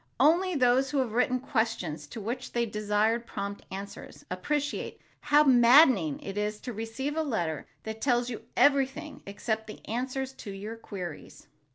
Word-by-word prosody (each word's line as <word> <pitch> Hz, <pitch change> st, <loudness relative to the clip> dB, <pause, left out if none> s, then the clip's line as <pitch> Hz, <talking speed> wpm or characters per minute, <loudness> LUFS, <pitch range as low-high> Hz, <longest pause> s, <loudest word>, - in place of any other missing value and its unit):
Only 345 Hz, +6 st, +4 dB
those 255 Hz, 0 st, +3 dB
who 290 Hz, -, -1 dB
have 255 Hz, -4 st, +1 dB
written 250 Hz, +2 st, +2 dB
questions 220 Hz, -, -2 dB
to 225 Hz, -, -8 dB
which 240 Hz, +5 st, -5 dB
they 235 Hz, 0 st, +1 dB
desired 215 Hz, +2 st, 0 dB
prompt 200 Hz, 0 st, -5 dB
answers, 195 Hz, +1 st, -8 dB
appreciate 290 Hz, +11 st, -2 dB, 0.2 s
how 295 Hz, 0 st, +5 dB
maddening 245 Hz, -, +6 dB
it 200 Hz, +1 st, -4 dB
is 210 Hz, 0 st, -2 dB
to 245 Hz, -, -5 dB
receive 225 Hz, +7 st, -4 dB
a 320 Hz, -, +1 dB
letter 175 Hz, -, -2 dB, 0.2 s
that 220 Hz, 0 st, -6 dB
tells 245 Hz, -3 st, +2 dB
you 235 Hz, -3 st, -5 dB, 0.2 s
everything 280 Hz, +2 st, +2 dB
except 220 Hz, +2 st, -3 dB
the 215 Hz, -, -11 dB
answers 260 Hz, +3 st, -3 dB
to 220 Hz, -, -9 dB
your 200 Hz, +3 st, -6 dB
queries. 185 Hz, -8 st, -8 dB
235 Hz, 160 wpm, -29 LUFS, 210-265 Hz, 0.2 s, maddening